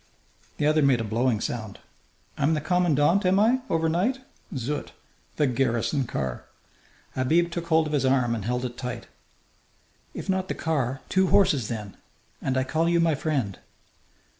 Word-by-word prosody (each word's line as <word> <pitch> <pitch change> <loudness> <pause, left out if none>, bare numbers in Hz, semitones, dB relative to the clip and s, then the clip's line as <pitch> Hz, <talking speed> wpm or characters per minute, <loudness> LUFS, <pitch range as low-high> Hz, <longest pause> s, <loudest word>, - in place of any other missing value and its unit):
The 145 - 0
other 155 +1 +3
made 135 -4 +4
a - - -1
blowing 115 +1 0
sound. 110 -3 -4 0.6
"I'm 155 +3 +2
the - - 0
commandant, 170 +2 +2
am 185 +1 +3
I, 235 +5 +4
overnight? 170 +10 +1 0.4
Zut! 135 +4 -4 0.4
The 150 - +2
garrison 125 +1 0
car!" 65 - -4 0.7
Habib 165 +7 +2
took 170 0 -4
hold 160 -1 +3
of 150 - -4
his 145 - +1
arm 130 -3 +2
and 110 -3 -3
held 125 +3 -1
it 125 0 -6
tight. 125 -2 -5 1.1
"If - - -6
not 190 -1 0
the - - -3
car, 135 -5 -1
two 190 0 +2
horses, 150 - +3
then. 105 -4 -6 0.4
And 130 -1 -1
I 130 - +2
call 160 +5 0
you 170 0 +3
my 165 -1 +3
friend." 135 -9 -2
145 Hz, 165 wpm, -26 LUFS, 125-170 Hz, 1.1 s, made